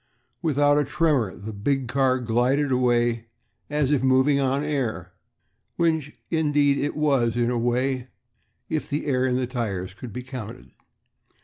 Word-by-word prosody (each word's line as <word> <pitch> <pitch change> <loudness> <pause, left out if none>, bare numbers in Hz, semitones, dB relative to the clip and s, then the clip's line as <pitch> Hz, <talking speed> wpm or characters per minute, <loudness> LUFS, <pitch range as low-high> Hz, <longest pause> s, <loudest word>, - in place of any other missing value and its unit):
Without 145 -3 +3
a - - +2
tremor 145 - +1
the 110 +2 -7
big 130 +6 -1
car 130 +1 +2
glided 125 +4 +1
away 120 -2 +1 0.4
as 145 -1 0
if 145 - +2
moving 130 +2 +3
on 135 +1 +1
air, 115 - -2 0.6
which 160 -4 0
indeed 145 -3 +2
it 145 - -2
was, 135 -6 +1
in 120 0 +1
a 120 - 0
way, 125 +2 0 0.6
if 155 -1 -3
the 145 +1 -2
air 130 -3 +1
in 125 - +1
the 130 0 0
tires 100 -7 -3
could 120 +3 -9
be 125 +4 -6
counted. 110 - -8
130 Hz, 150 wpm, -24 LUFS, 120-145 Hz, 0.6 s, Without